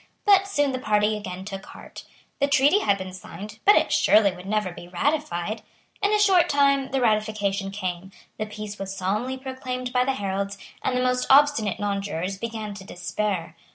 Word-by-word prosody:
But 395 -1 +5
soon 290 -8 +1
the 255 - -3
party 210 -2 +2
again 185 -3 -6
took 195 -1 -6
heart. - - -11 0.3
The 280 - +3
treaty 285 +7 +4
had 200 - +2
been 185 -1 -7
signed; 200 +4 -9
but 410 - +8
it - - +2
surely 210 -2 +5
would 180 +1 -11
never 210 -2 0
be 175 0 -11
ratified. 215 - -1 0.4
In 405 - +2
a 425 - +4
short 375 -5 +4
time 275 -1 +3
the 270 - 0
ratification 215 -4 0
came; 190 -2 -5 0.3
the 215 - -2
peace 210 -1 -7
was 195 0 -5
solemnly 215 +8 -1
proclaimed 255 -1 -5
by 250 0 +3
the 270 +1 0
heralds; 200 -1 -3 0.3
and 250 - 0
the 250 - +1
most 250 0 +1
obstinate 270 -8 +4
nonjurors 195 -2 -2
began 220 -2 -5
to 200 -1 -10
despair. 180 -2 -3
215 Hz, 185 wpm, -25 LUFS, 195-265 Hz, 0.4 s, but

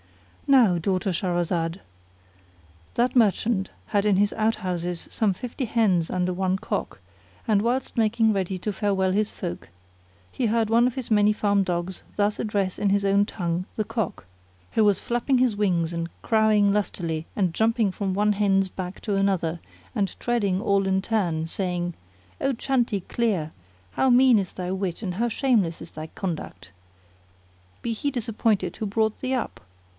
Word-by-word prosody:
Now, 235 -11 +5
daughter 190 +2 0
Shahrazad, 175 -1 -1 1.2
that 245 +2 +1
mer 225 -5 +6
chant 195 -2 -2 0.2
had 205 -2 +1
in 205 -2 +3
his 205 +1 +2
out 220 +1 +1
houses 175 -2 -3
some 215 -3 +1
fifty 245 +7 -5
hens 210 -8 +2
under 180 0 0
one 185 +1 0
cock, - - -4 0.5
and 210 -3 +3
whilst 245 +4 -1
making 225 -1 +3
ready 190 -1 -1
to 205 +3 -3
farewell 190 -2 +1
his 210 +2 +1
folk 175 - -6 0.6
he 245 - -1
heard 225 0 +1
one 235 +2 +4
of 250 - -3
his 255 -4 -5
many 210 0 +5
farm 205 -1 +2
dogs 175 0 -3 0.2
thus 205 0 +1
address 200 -4 -1
in 205 - +2
his 200 0 +2
own 200 +1 +4
tongue 175 -3 -2
the 215 - 0
Cock, 225 - -3 0.5
who 220 - +3
was 205 -2 +3
flapping 240 +3 0
his 250 -4 +2
wings 175 -5 +1
and 170 0 -3
crowing 215 -3 +3
lustily 170 -6 -2
and 185 -5 +1
jumping 220 0 +2
from 195 0 -2
one 210 +1 +3
hen's 195 -1 +2
back 185 +1 -6
to 205 -3 -1
another 185 -4 0 0.4
and 200 -4 -1
treading 205 -6 0
all 200 -1 +2
in 190 0 +2
turn, 180 -7 0
saying 175 0 -2 0.5
"O 275 - +1
Chanticleer! 230 - 0 0.4
how 265 - +2
mean 250 -1 +6
is 190 -2 -3
thy 180 0 -4
wit 190 +1 -3
and 185 -3 -2
how 235 +6 0
shameless 220 - +1
is 160 - -10
thy 155 0 -7
conduct! 160 - -6 1.1
Be 235 - -1
he 285 +6 -1
disappointed 225 -3 0
who 215 - -3
brought 220 +1 0
thee 260 0 -1
up! 250 - -4
200 Hz, 165 wpm, -25 LUFS, 185-225 Hz, 1.2 s, mer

